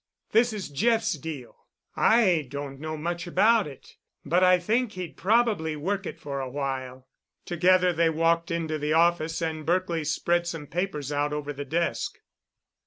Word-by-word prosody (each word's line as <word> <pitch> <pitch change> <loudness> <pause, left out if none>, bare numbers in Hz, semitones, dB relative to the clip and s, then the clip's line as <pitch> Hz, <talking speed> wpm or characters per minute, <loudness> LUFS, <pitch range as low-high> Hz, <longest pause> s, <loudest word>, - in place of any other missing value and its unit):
This 235 +2 +4
is 205 -6 -5
Jeff's 225 +8 +1
deal. 145 -5 -8 0.3
I 185 - +3
don't 140 0 -6
know 155 +1 -5
much 170 +3 -3
about 220 +2 +3
it, 140 -3 -13 0.3
but 175 +5 +2
I 185 0 +6
think 220 +6 0
he'd 180 -3 -6
probably 205 -6 +1
work 195 +6 -2
it - - -7
for 140 -3 -5
a 130 - -4
while." 130 -2 -4 0.4
Together 180 +1 +3
they 165 0 +3
walked 165 +1 +1
into 160 -2 -2
the 150 +1 0
office, 165 0 +2
and 160 -1 -3
Berkely 175 -1 0
spread 170 +3 0
some 165 -3 -5
papers 150 -3 -3
out 145 0 0
over 145 -1 -4
the 145 +1 -6
desk. 170 +5 -1
165 Hz, 165 wpm, -26 LUFS, 150-185 Hz, 0.4 s, I